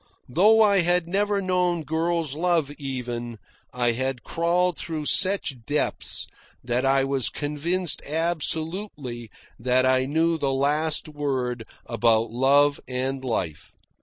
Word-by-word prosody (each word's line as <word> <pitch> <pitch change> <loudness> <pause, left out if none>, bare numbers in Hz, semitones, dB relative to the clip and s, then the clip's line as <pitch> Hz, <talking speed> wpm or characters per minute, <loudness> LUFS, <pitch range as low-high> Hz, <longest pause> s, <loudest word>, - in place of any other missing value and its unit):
Though 215 - +5
I 200 -2 +4
had 175 0 +2
never 200 +2 0
known 180 -2 +1
girl's 160 0 -1
love 165 -2 +1
even, 120 -4 -5 0.3
I 120 -1 +1
had 130 +1 -3
crawled 175 +1 +1
through 155 -3 -4
such 185 - +2
depths 145 +5 -1 0.4
that 120 +1 0
I 135 0 +3
was 135 -2 +1
convinced 160 +4 -1
absolutely 160 - -2 0.3
that 130 +2 +2
I 130 0 +3
knew 165 +3 +1
the 140 -2 0
last 150 +4 +1
word 130 -6 -3 0.2
about 115 -1 +2
love 140 +4 +3
and 130 +1 -2
life. 95 - -3
145 Hz, 125 wpm, -25 LUFS, 130-170 Hz, 0.4 s, Though